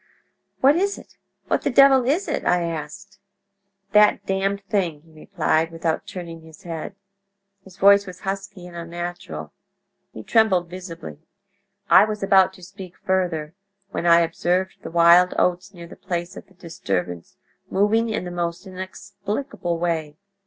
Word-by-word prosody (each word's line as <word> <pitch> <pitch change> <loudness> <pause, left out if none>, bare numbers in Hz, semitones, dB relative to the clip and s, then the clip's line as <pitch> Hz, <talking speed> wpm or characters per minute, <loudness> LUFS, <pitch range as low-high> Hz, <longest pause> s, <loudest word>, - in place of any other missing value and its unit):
"'What 275 +3 +6
is 400 +2 0
it? - - -15 0.3
What - - 0
the - - 0
devil 270 -1 +6
is 310 +10 0
it?' - - -2
I 180 -1 +2
asked. 170 +5 -6 0.7
"'That 210 0 +4
Damned 195 +1 -1
Thing!' 175 -7 -2
he 165 - -22
replied, 160 -1 0
without 165 -1 -3
turning 170 -3 -8
his 160 +4 -16
head. 170 +2 -6 0.7
His 190 -1 -16
voice 200 0 +5
was 185 0 -10
husky 195 -1 -5
and 175 -1 -11
unnatural. 170 - -6 0.6
He 110 - -9
trembled 185 - +2
visibly. 180 -4 -8 0.7
"I - - +7
was 210 -2 -4
about 195 -1 +5
to 185 -1 -16
speak 185 0 -11
further, 175 -5 -1 0.4
when 175 - -2
I 170 0 +7
observed 175 +3 -1
the - - -7
wild 170 +2 +5
oats 180 +3 0
near 175 -3 -11
the 170 - -12
place 175 0 -4
of - - -11
the 190 - -24
disturbance 95 - -4 0.3
moving 220 +4 +2
in 220 -4 -2
the 180 - -6
most 175 +1 -3
inexplicable 195 +1 -5
way. 160 -3 -2
180 Hz, 150 wpm, -23 LUFS, 170-200 Hz, 0.7 s, I